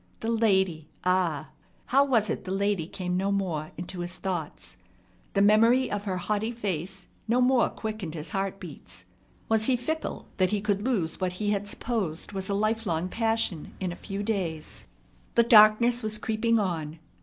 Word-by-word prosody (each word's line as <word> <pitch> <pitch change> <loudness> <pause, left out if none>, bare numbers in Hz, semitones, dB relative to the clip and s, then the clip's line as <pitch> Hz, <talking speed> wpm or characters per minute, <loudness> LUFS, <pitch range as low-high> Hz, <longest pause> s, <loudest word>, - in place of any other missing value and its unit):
The 225 - -1
lady! 190 -8 +1
Ah! 175 -5 +1 0.3
How 275 +2 +4
was 230 -6 +2
it - - -3
the 185 - -6
lady 195 -4 0
came 180 0 -3
no 195 +2 0
more 175 -6 -1
into 180 +2 -6
his 175 +1 -4
thoughts? 175 -6 -5 0.6
The 200 - +4
memory 230 +5 +5
of 205 0 -3
her 185 -2 -1
haughty 210 +4 -1
face 190 -4 -4 0.2
no 235 +3 +3
more 250 -1 +4
quickened 215 -7 -5
his 155 +1 -4
heart 195 0 -2
beats. 145 - -11 0.4
Was 220 -1 +2
he 255 0 +3
fickle 315 +6 -4
that 185 -1 +3
he 210 - 0
could 205 -1 0
lose 200 -9 -1
what 185 -1 0
he 205 +3 -1
had 205 0 -1
supposed 205 -8 -2
was 190 -1 -3
a 200 - +1
lifelong 205 -5 0
passion 225 -8 -1
in 185 -2 -2
a - - -6
few 195 +2 -5
days? 180 -8 -3 0.5
The 235 - +6
darkness 230 +2 +6
was 215 -1 -1
creeping 230 +1 +1
on. 165 -6 -2
200 Hz, 175 wpm, -27 LUFS, 180-225 Hz, 0.6 s, The